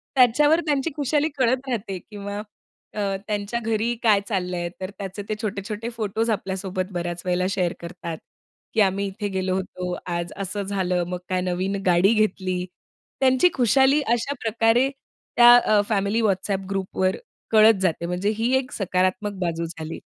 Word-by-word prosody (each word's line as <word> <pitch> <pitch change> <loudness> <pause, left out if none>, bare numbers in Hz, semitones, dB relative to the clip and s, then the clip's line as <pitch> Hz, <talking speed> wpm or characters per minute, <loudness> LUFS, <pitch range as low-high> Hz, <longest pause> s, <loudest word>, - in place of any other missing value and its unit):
त्याच्यावर 290 +6 +5
त्यांची 290 -1 +1
खुशाली 295 +1 +1
कळत 260 +1 +1
राहते 215 -6 -3
किंवा 205 +1 -7 0.6
अ, - - -5 0.3
त्यांच्या 210 +2 -2
घरी 225 +1 0
काय 210 -3 +5
चाललंय. 180 -4 -2
तर 185 - -3
त्याचे 195 +1 -6
ते - - 0
छोटे-छोटे 210 +1 -4
फोटोस 225 -1 -2
आपल्यासोबत 190 -2 -2
बऱ्याच 175 0 -3
वेळेला 180 0 +1
शेअर 180 -3 0
करतात 170 -1 -6 0.6
की 220 - +3
आम्ही 200 0 +2
इथे 195 +1 -4
गेलो 190 -1 -1
होतो, 180 -1 -4
आज 170 0 -3
असं 195 +1 -3
झालं, 185 -3 0
मग 180 0 -3
काय 185 -1 0
नवीन 185 +2 -1
गाडी 180 +4 +4
घेतली. 185 -4 0 0.5
त्यांची 260 +6 +4
खुशाली 265 +4 +4
अशा 240 +4 -1
प्रकारे 225 +3 +3 0.5
त्या 240 0 +9
अ, 215 -3 +3
फॅमिली 205 +1 +1
WhatsApp 195 -2 0
ग्रुपवर 190 -1 -1 0.3
कळत 220 -1 +6
जाते. 170 -2 0
म्हणजे 180 +4 -1
ही 235 +3 +1
एक 255 -1 -3
सकारात्मक 190 +2 0
बाजू 170 -1 -1
झाली. 160 -1 -7
200 Hz, 150 wpm, -24 LUFS, 185-230 Hz, 0.6 s, त्या